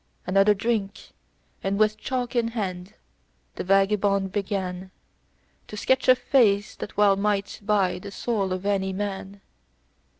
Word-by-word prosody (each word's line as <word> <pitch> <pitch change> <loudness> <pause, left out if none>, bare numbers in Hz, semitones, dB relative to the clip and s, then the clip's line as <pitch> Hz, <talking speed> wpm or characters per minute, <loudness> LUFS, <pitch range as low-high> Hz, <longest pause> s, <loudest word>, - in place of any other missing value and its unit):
Another 195 +3 +4
drink, 205 -1 -2 0.5
and 195 +1 -1
with 215 0 +3
chalk 250 +1 -4
in 235 -1 +2
hand, 185 -1 -4 0.6
the - - -5
vagabond 195 0 +2
began 190 -2 -3 0.8
To 210 - -8
sketch 260 +5 +1
a 255 - +8
face 215 -6 +2
that 205 - -8
well 205 -1 +5
might 200 0 -1
buy 200 -3 +1
the 200 - -8
soul 200 -1 -2
of 185 +1 -3
any 190 -1 0
man. 195 0 -5
200 Hz, 135 wpm, -25 LUFS, 195-210 Hz, 0.8 s, a